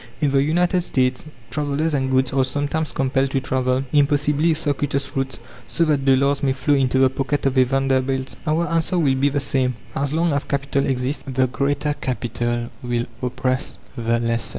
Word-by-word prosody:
In 145 -3 +1
the 135 0 +3
United 175 +5 +2
States 130 -6 0 0.3
travellers 150 +2 -1
and 135 -2 0
goods 130 -1 +1
are 135 -1 +3
sometimes 145 +4 -2
compelled 135 0 0
to 135 - 0
travel 130 0 0
impossibly 145 +2 +3
circuitous 145 -2 -2
routes 135 0 -2 0.3
so 165 - +1
that 145 -3 +1
dollars 140 +1 +3
may 135 -2 +2
flow 135 +2 +1
into 130 -2 +2
the 130 0 +6
pocket 140 +2 -2
of 135 -1 +1
a 130 -1 +5
Vanderbilt. 135 0 0
Our 165 +3 +1
answer 165 +2 0
will 145 -6 +3
be 135 +2 +2
the 145 +1 -1
same: 130 -2 0 0.2
As 140 0 -1
long 165 0 +1
as 140 - 0
Capital 140 0 -1
exists, 130 +2 -1
the 130 -1 +1
Greater 145 +3 -1
Capital 120 -3 -3
will 120 -1 -1 0.2
oppress 130 +1 -2 0.2
the 115 0 0
lesser. 115 0 -1
135 Hz, 180 wpm, -21 LUFS, 130-145 Hz, 0.3 s, the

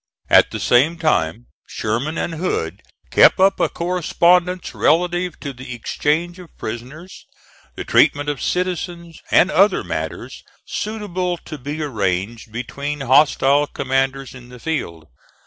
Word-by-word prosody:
At - - +6
the - - -5
same 145 +8 +3
time 80 - 0 0.2
Sherman 120 +9 -2
and 170 - -2
Hood 100 - -3 0.3
kept - - +6
up 195 +1 +4
a - - +2
correspondence 180 +1 +1
relative 175 +1 +1
to 140 -2 -5
the 125 -1 -8
exchange 160 - -1
of 180 -2 -14
prisoners, 130 +11 -8 0.5
the - - -5
treatment 145 +1 +3
of 145 -3 -3
citizens, 175 -2 -3
and 185 - +4
other 195 +7 +3
matters - - -5 0.2
suitable 185 -5 -3
to 155 - -8
be 145 +4 -4
arranged 105 -2 -2
between 140 +5 -5
hostile 140 +1 +4
commanders 135 0 -2
in 125 -2 -13
the 125 - -11
field. 85 - -4
150 Hz, 130 wpm, -20 LUFS, 125-175 Hz, 0.5 s, At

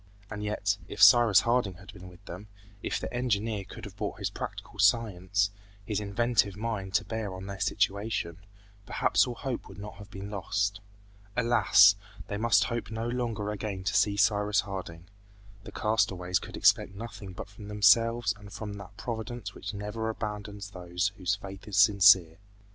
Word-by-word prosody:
And 105 0 -5
yet, 100 -1 -1
if - - -8
Cyrus 120 -5 +8
Harding 115 -5 +1
had 100 +3 -13
been 90 -2 -11
with 90 -1 -18
them, 90 +4 -9 0.3
if - - -2
the - - -6
engineer 110 -4 -1
could - - -10
have - - -10
brought - - -4
his - - -3
practical - - -7
science, 100 -1 +2 0.3
his 105 0 -1
inventive 105 0 +1
mind 105 -4 -3
to - - +2
bear 110 -4 -4
on 95 +1 -8
their 100 -1 -7
situation, 100 -3 -1 0.5
perhaps - - +2
all 120 - -4
hope 125 0 -4
would - - -12
not 105 +1 -9
have 105 -1 -12
been 100 +1 -8
lost. 100 +1 -1 0.6
Alas! 115 -4 +6 0.3
they 105 - -2
must 110 -3 +4
hope 115 +4 -3
no 110 +1 -3
longer 115 -4 -2
again 100 -2 -4
to 100 +1 -1
see 100 0 +2
Cyrus 105 0 +3
Harding. 90 -4 -7 0.6
The - - -8
castaways 95 -5 0
could - - -9
expect 100 - +3
nothing 100 -3 -8
but 90 - -7
from 100 +1 -12
themselves 110 +2 +4
and 105 -1 -13
from 105 +1 -6
that 100 - -12
Providence 115 -3 -5
which 100 - -6
never 105 +2 -4
abandons 105 -2 -5
those 90 +1 -2
whose 95 0 0
faith 95 0 -10
is 100 -2 -3
sincere. 100 -5 +6
105 Hz, 170 wpm, -29 LUFS, 95-110 Hz, 0.6 s, Cyrus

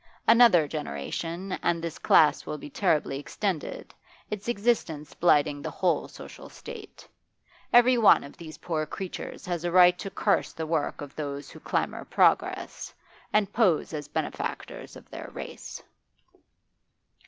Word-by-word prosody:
Another 230 -9 +6
generation, 165 - -5
and 170 -1 +1
this 165 -1 -5
class 155 -2 +4
will 150 - -3
be 145 0 -10
terribly 150 -7 0
extended, 175 +1 -4 0.4
its 210 +1 -5
existence 200 -10 -1
blighting 145 -4 +2
the - - -4
whole - - 0
social - - -11
state. 450 -4 -11 0.6
Every 245 +1 +6
one 220 - +6
of 140 - -11
these 160 -2 -10
poor 155 -3 -3
creatures 190 +3 -7
has 175 -2 -3
a 175 - -1
right 180 0 +6
to 195 - -5
curse 200 +1 0
the 160 - -4
work 155 -2 -2
of 145 -1 -9
those 145 -2 -5
who - - -12
clamour - - -2
progress, - - +1 0.4
and 210 -1 +1
pose 190 -9 +2
as 150 -2 -5
benefactors 155 +1 -5
of - - -13
their - - -8
race. - - -8
170 Hz, 140 wpm, -27 LUFS, 150-200 Hz, 0.6 s, Another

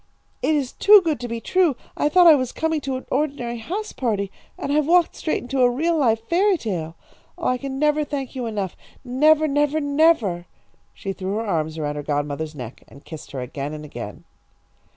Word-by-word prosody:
It 310 - +2
is 275 -4 -1
too 415 +1 +7
good 310 -7 0
to 245 - -5
be 230 0 -4
true. 350 +2 +2 0.2
I 295 - +1
thought 360 +3 +5
I 330 - +10
was 255 -4 0
coming 320 -1 -1
to 270 -1 -3
an 260 - -6
ordinary 260 -4 -1
house 405 - -4
party, 205 -6 -2 0.3
and 280 - -3
I've 300 -1 +2
walked 345 0 +4
straight 315 - -2
into 260 +1 -1
a 245 - +6
real, 320 +8 0
live 230 -7 +2
fairy 365 - +2
tale! 170 - -4 0.4
Oh, 340 - -2
I 255 0 +1
can 270 0 -5
never 300 +1 +2
thank 280 -3 -4
you 250 -3 -3
enough! 200 -5 -3 0.3
Never, 305 +5 +4
never, 295 +1 +1
never." 285 - +2 0.5
She 195 - -4
threw 190 +1 -4
her 225 +1 -2
arms 160 -5 -1
around 150 -1 -3
her - - -3
godmother's 145 +1 -3
neck 125 -3 -8
and 140 - -16
kissed 160 -2 -9
her 130 - -4
again 140 +4 -5
and 150 0 -8
again. 150 - -8
255 Hz, 205 wpm, -22 LUFS, 190-305 Hz, 0.5 s, I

